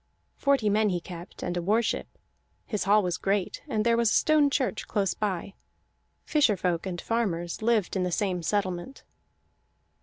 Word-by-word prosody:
Forty 280 Hz, -6 st, +2 dB
men 210 Hz, +1 st, +3 dB
he 180 Hz, -2 st, 0 dB
kept, 175 Hz, +1 st, -10 dB
and 175 Hz, -, -2 dB
a 175 Hz, -, -1 dB
war 215 Hz, +7 st, +2 dB
ship; -, -, -2 dB, 0.6 s
his 210 Hz, -5 st, -2 dB
hall 205 Hz, +1 st, +4 dB
was 180 Hz, -2 st, -2 dB
great, 195 Hz, -1 st, -1 dB
and 215 Hz, 0 st, -1 dB
there 235 Hz, 0 st, +4 dB
was 235 Hz, -1 st, +3 dB
a -, -, +2 dB
stone 305 Hz, -2 st, +4 dB
church 265 Hz, -5 st, -1 dB
close 195 Hz, -3 st, 0 dB
by; 195 Hz, -2 st, -3 dB, 0.7 s
fisher 280 Hz, -10 st, +3 dB
folk 180 Hz, 0 st, -1 dB
and 175 Hz, -2 st, -4 dB
farmers 175 Hz, -8 st, -2 dB
lived 220 Hz, -4 st, +1 dB
in 190 Hz, -, +1 dB
the 180 Hz, 0 st, -1 dB
same 185 Hz, -1 st, 0 dB
settlement. 190 Hz, +5 st, -2 dB
205 Hz, 175 wpm, -27 LUFS, 180-225 Hz, 0.7 s, hall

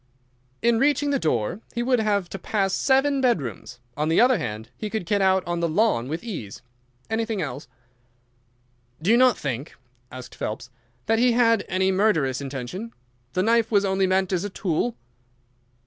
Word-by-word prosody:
"In 235 Hz, -1 st, +3 dB
reaching 290 Hz, +1 st, +2 dB
the 275 Hz, -, +1 dB
door 155 Hz, -, -1 dB
he 240 Hz, -, 0 dB
would 250 Hz, 0 st, +2 dB
have 205 Hz, -4 st, 0 dB
to 195 Hz, -, -6 dB
pass 195 Hz, -3 st, -1 dB
seven 270 Hz, +3 st, +2 dB
bedrooms. 150 Hz, -, -1 dB, 0.2 s
On 150 Hz, +2 st, -1 dB
the 165 Hz, -, +3 dB
other 250 Hz, -1 st, +5 dB
hand, 110 Hz, +1 st, -5 dB
he 215 Hz, -, -5 dB
could 220 Hz, -4 st, -3 dB
get 200 Hz, +3 st, +1 dB
out 190 Hz, -1 st, +3 dB
on 175 Hz, 0 st, -2 dB
to 170 Hz, -, +1 dB
the -, -, -4 dB
lawn 165 Hz, -, +2 dB
with 160 Hz, -, -4 dB
ease. 165 Hz, -, -7 dB, 0.4 s
Anything 225 Hz, -1 st, -2 dB
else?" 140 Hz, -5 st, -5 dB, 1.3 s
"You 155 Hz, -, -19 dB
do 220 Hz, +7 st, +4 dB
not 255 Hz, -1 st, +5 dB
think," 135 Hz, +2 st, -4 dB, 0.4 s
asked 130 Hz, -1 st, -9 dB
Phelps, 115 Hz, +4 st, -5 dB, 0.3 s
"that 225 Hz, -, +2 dB
he 245 Hz, 0 st, +4 dB
had 230 Hz, -2 st, +3 dB
any 190 Hz, +1 st, +1 dB
murderous 160 Hz, -, +1 dB
intention? 140 Hz, -, -6 dB, 0.4 s
The 185 Hz, -, +1 dB
knife 230 Hz, +1 st, +3 dB
was 205 Hz, -2 st, +3 dB
only 190 Hz, 0 st, +1 dB
meant 190 Hz, 0 st, +1 dB
as 180 Hz, 0 st, 0 dB
a 205 Hz, -, -3 dB
tool." 190 Hz, +4 st, -1 dB
195 Hz, 180 wpm, -24 LUFS, 155-230 Hz, 1.3 s, other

